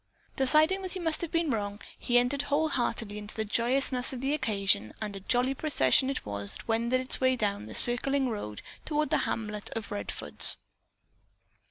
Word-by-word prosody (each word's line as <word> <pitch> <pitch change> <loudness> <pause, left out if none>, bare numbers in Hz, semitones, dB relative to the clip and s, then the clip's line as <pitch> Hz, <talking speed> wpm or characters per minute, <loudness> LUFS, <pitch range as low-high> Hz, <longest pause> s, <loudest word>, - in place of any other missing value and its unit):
Deciding 310 +8 +4
that 370 -2 -6
he 375 - -5
must 325 -3 -1
have 340 - -3
been 330 -3 0
wrong, 205 -2 -3 0.2
he 245 - 0
entered 250 +3 +1
wholeheartedly 280 -8 -1
into 210 0 -6
the 220 - -2
joyousness 250 +3 +1
of 260 - -5
the 270 +3 -1
occasion 200 - 0
and 210 -2 -5
a - - -6
jolly 245 +6 0
procession 265 - +3
it 275 - -4
was 100 -1 -4
that - - -8
wended 235 +3 +1
its 255 +1 -1
way 260 0 +3
down 200 - -2
the 110 - -7
circling 265 +3 +4
road 205 - -6 0.2
toward 305 0 -1
the - - +3
hamlet 210 -2 -4
of 225 -2 -5
Redfords. 100 -2 +2
245 Hz, 180 wpm, -28 LUFS, 210-275 Hz, 0.2 s, Deciding